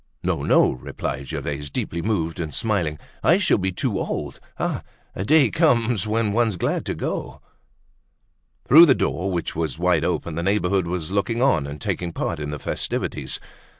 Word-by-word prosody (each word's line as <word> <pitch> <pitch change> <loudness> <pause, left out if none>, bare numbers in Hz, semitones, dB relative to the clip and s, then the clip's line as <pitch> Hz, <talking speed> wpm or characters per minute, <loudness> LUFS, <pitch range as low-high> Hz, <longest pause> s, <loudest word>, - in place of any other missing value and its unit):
"No, - - 0
no," - - +4
replied 65 +2 -5
Gervaise, 75 0 -4
deeply 85 +4 -3
moved 85 -4 -1
and 80 -3 -3
smiling; 90 -9 0 0.2
"I 175 - +5
shall 190 - +3
be 95 0 0
too 90 - -1
old. - - -4 0.2
Ah! - - -1 0.3
a 95 - -3
day 150 +8 +4
comes 120 - +2
when 110 -1 0
one's 115 -2 +2
glad 85 - -1
to - - -1
go." - - -4 1.3
Through 165 +6 +9
the 135 - +5
door, 95 +3 -1
which 85 -2 -3
was 80 -6 -2
wide - - +2
open, 85 - -1
the 85 - -2
neighborhood 95 -1 +1
was 90 -1 -3
looking 115 +5 0
on 130 - +3
and 75 +1 -7
taking 85 +4 -3
part 85 - -2
in 75 -1 -4
the 75 - -4
festivities. - - -3
95 Hz, 175 wpm, -23 LUFS, 80-115 Hz, 1.3 s, Through